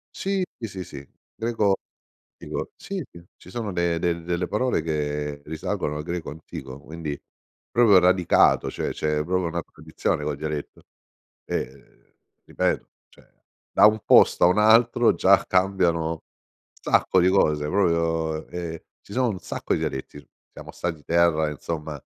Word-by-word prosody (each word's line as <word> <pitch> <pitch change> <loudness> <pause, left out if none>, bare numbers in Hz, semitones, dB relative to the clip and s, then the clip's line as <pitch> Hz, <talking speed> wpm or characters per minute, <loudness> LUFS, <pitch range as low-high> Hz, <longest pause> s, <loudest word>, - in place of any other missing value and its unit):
Sì, 195 -1 -1
sì, 115 - -5
sì, 95 -2 -7
sì, 70 -5 -11 0.3
greco 110 -4 +1 0.6
antico. - - -5
Sì, 195 -3 -5
sì, 85 0 -14
ci 90 - -15
sono 110 -4 -4
de 85 -1 0
del 85 -1 -1
delle 90 +1 -1
parole 115 -6 0
che 75 -2 -3
risalgono 75 -1 -3
al 75 - -4
greco 85 -2 -4
antico, 70 -3 -9
quindi 80 -2 -6 0.5
proprio 110 -6 +6
radicato, 90 -1 +4
cioè - - -3
c'è 75 -1 -1
proprio 90 0 0
una 85 0 -3
tradizione 75 - -3
col 75 -2 -2
dialetto, 75 -1 -5 0.6
e 65 +2 -7 0.3
ripeto, - - -1 0.2
cioè - - -22 0.4
da - - +7
un 110 +1 +4
posto - - +6
a - - +8
un 90 - +2
altro 115 +2 +5
già - - +4
cambiano 85 -4 +1 0.5
sacco 95 - +2
di 90 - +4
cose 75 -6 +2
proprio 85 -4 0
ehm, 85 -2 -5 0.2
ci 100 - -14
sono 125 +1 +1
un 100 -5 -3
sacco - - -3
di - - 0
dialetti 65 +2 -4
s - - -15 0.3
siamo - - -11
stati 80 -4 -4
terra 85 -2 +3
insomma, 75 0 -5
85 Hz, 150 wpm, -24 LUFS, 75-95 Hz, 0.6 s, a